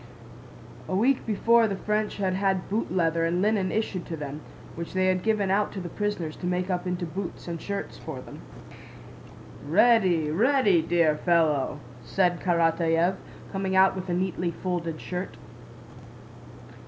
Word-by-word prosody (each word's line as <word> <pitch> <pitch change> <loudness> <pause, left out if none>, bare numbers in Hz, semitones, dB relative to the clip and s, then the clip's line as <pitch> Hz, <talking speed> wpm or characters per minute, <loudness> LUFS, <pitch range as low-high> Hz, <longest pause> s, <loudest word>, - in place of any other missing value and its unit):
A 185 - -1
week 245 +7 +2
before 230 +2 +4
the 200 - -2
French 210 +2 -1
had 190 -2 0
had 190 -1 0
boot 220 +3 -1
leather 165 -2 +1
and 170 +2 +1
linen 200 -2 +1
issued 205 -5 -2
to 165 - -5
them, 150 0 -6 0.3
which 170 0 -7
they 185 0 +1
had 185 -1 +2
given 210 -2 +1
out 205 +2 +1
to 195 - -5
the 175 -2 -6
prisoners 205 -7 -2
to 180 - -4
make 180 +1 -1
up 180 0 -2
into 180 0 -2
boots 175 +2 -6
and 170 -1 -5
shirts 200 0 -5
for - - -7
them. - - -11 1.2
"Ready, 185 -10 +3
ready, 210 - +3
dear 165 -2 +2
fellow!" 160 -6 +2 0.2
said 180 -3 +1
Karatáev, 170 +1 +2 0.3
coming 195 -1 -2
out 190 0 +5
with 185 0 -6
a - - 0
neatly 180 -1 -1
folded 170 -2 -3
shirt. 180 +1 -5
185 Hz, 155 wpm, -26 LUFS, 170-200 Hz, 1.2 s, out